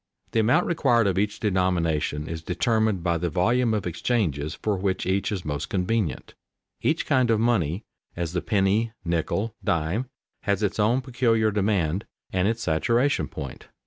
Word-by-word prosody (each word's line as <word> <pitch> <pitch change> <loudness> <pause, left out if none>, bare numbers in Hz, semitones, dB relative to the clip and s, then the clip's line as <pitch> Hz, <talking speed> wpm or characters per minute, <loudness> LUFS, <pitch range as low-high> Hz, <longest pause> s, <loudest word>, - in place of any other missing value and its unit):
The 115 - +1
amount 125 +11 +3
required 120 -9 +3
of 95 -1 +1
each 105 0 -1
denomination 85 -6 0
is 80 -1 -5
determined 110 0 +1
by 85 -1 +1
the 90 +1 -1
volume 115 +9 +2
of 105 - -2
exchanges 85 - -1
for 105 -2 -1
which 95 0 -1
each 95 +3 0
is 95 -4 -3
most 75 -2 -3
convenient. 95 -1 -1 0.5
Each 160 +1 +1
kind 130 -4 +2
of 110 -2 +3
money, 105 -6 +1 0.3
as 85 -1 -3
the 90 - 0
penny, 105 +2 +1
nickel, 85 +6 -1
dime, 85 +10 0 0.3
has 100 0 0
its 105 +1 -1
own 115 +5 +3
peculiar 120 -4 +1
demand 100 -3 0 0.3
and 95 +1 +2
its 115 +1 -1
saturation 115 - +1
point. 70 - -8
100 Hz, 160 wpm, -25 LUFS, 85-115 Hz, 0.5 s, amount